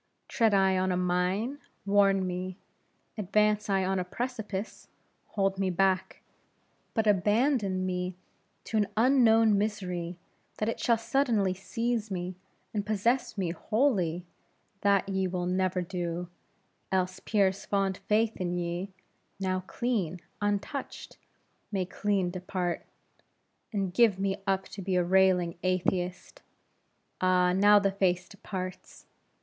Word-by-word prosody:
Tread 225 Hz, -3 st, +2 dB
I 190 Hz, -1 st, +3 dB
on 185 Hz, 0 st, +1 dB
a 180 Hz, -, 0 dB
mine, 180 Hz, +9 st, 0 dB, 0.3 s
warn 195 Hz, -1 st, +4 dB
me; 185 Hz, 0 st, -4 dB, 0.6 s
advance 210 Hz, +1 st, +2 dB
I 195 Hz, -1 st, +2 dB
on 190 Hz, 0 st, 0 dB
a -, -, 0 dB
precipice, 215 Hz, 0 st, -5 dB, 0.4 s
hold 195 Hz, -1 st, 0 dB
me 195 Hz, -1 st, +1 dB
back; 190 Hz, +1 st, 0 dB, 0.7 s
but 220 Hz, -2 st, +2 dB
abandon 205 Hz, -1 st, +2 dB
me 180 Hz, 0 st, -2 dB, 0.5 s
to 220 Hz, -, -2 dB
an 210 Hz, -2 st, +2 dB
unknown 225 Hz, -4 st, +5 dB
misery, 180 Hz, -5 st, -3 dB, 0.4 s
that 215 Hz, -, -1 dB
it 230 Hz, -, -2 dB
shall 235 Hz, -2 st, +3 dB
suddenly 225 Hz, -5 st, +1 dB
seize 230 Hz, +3 st, -2 dB
me, 180 Hz, -1 st, -3 dB, 0.4 s
and 210 Hz, -2 st, -1 dB
possess 220 Hz, +4 st, 0 dB
me, 180 Hz, -4 st, 0 dB
wholly, 185 Hz, -, 0 dB, 0.6 s
that 200 Hz, -1 st, +3 dB
ye 190 Hz, -1 st, 0 dB
will 180 Hz, -1 st, -2 dB
never 185 Hz, 0 st, 0 dB
do; 175 Hz, -1 st, -4 dB, 0.6 s
else, 185 Hz, 0 st, 0 dB
Pierre's 195 Hz, -3 st, +1 dB
fond 195 Hz, -2 st, 0 dB
faith 220 Hz, +1 st, +2 dB
in 175 Hz, -1 st, -1 dB
ye 175 Hz, +2 st, -3 dB, 0.5 s
now 185 Hz, -1 st, 0 dB
clean, 200 Hz, -9 st, -1 dB, 0.2 s
untouched 205 Hz, +7 st, -3 dB, 0.5 s
may 190 Hz, -3 st, 0 dB
clean 190 Hz, -1 st, 0 dB
depart; 180 Hz, -1 st, -3 dB, 0.8 s
and 195 Hz, -4 st, -2 dB
give 225 Hz, -3 st, +4 dB
me 195 Hz, 0 st, -1 dB
up 195 Hz, 0 st, +1 dB
to 200 Hz, -, -7 dB
be 185 Hz, 0 st, -1 dB
a 180 Hz, -, +3 dB
railing 180 Hz, -2 st, +3 dB
atheist! 185 Hz, 0 st, -1 dB, 0.8 s
Ah, 180 Hz, -1 st, +3 dB
now 205 Hz, +2 st, +6 dB
the 200 Hz, -1 st, +2 dB
face 180 Hz, -2 st, +1 dB
departs. 185 Hz, -2 st, -7 dB
190 Hz, 130 wpm, -29 LUFS, 180-210 Hz, 0.8 s, now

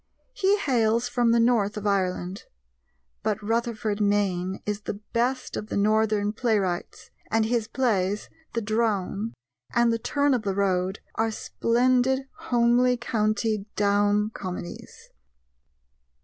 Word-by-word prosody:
He 405 Hz, -4 st, +2 dB
hails 235 Hz, -, +1 dB
from 245 Hz, -1 st, +1 dB
the 235 Hz, 0 st, +4 dB
north 230 Hz, -3 st, +2 dB
of 210 Hz, -, -5 dB
Ireland; 185 Hz, -1 st, -1 dB, 0.8 s
but 210 Hz, -, -1 dB
Rutherford 220 Hz, -1 st, -1 dB
Mayne 195 Hz, -3 st, +1 dB
is 210 Hz, 0 st, -2 dB
the 205 Hz, -, -4 dB
best 240 Hz, +5 st, -2 dB
of 210 Hz, -, -4 dB
the -, -, -3 dB
Northern 210 Hz, 0 st, +2 dB
playwrights, 210 Hz, -7 st, -1 dB, 0.2 s
and 225 Hz, 0 st, +2 dB
his 230 Hz, -1 st, 0 dB
plays, 210 Hz, -5 st, 0 dB, 0.3 s
The 230 Hz, -, -1 dB
Drone 215 Hz, -1 st, -1 dB, 0.4 s
and 235 Hz, -1 st, +4 dB
The 230 Hz, -, -1 dB
Turn 285 Hz, +4 st, +1 dB
of 250 Hz, -, +1 dB
the 200 Hz, -3 st, -2 dB
Road, 190 Hz, -1 st, 0 dB
are 225 Hz, 0 st, 0 dB
splendid 255 Hz, +4 st, +1 dB
homely 245 Hz, +1 st, +3 dB
county 215 Hz, -3 st, 0 dB
Down 205 Hz, +1 st, +2 dB
comedies. 180 Hz, -4 st, -8 dB
220 Hz, 125 wpm, -26 LUFS, 205-235 Hz, 0.8 s, the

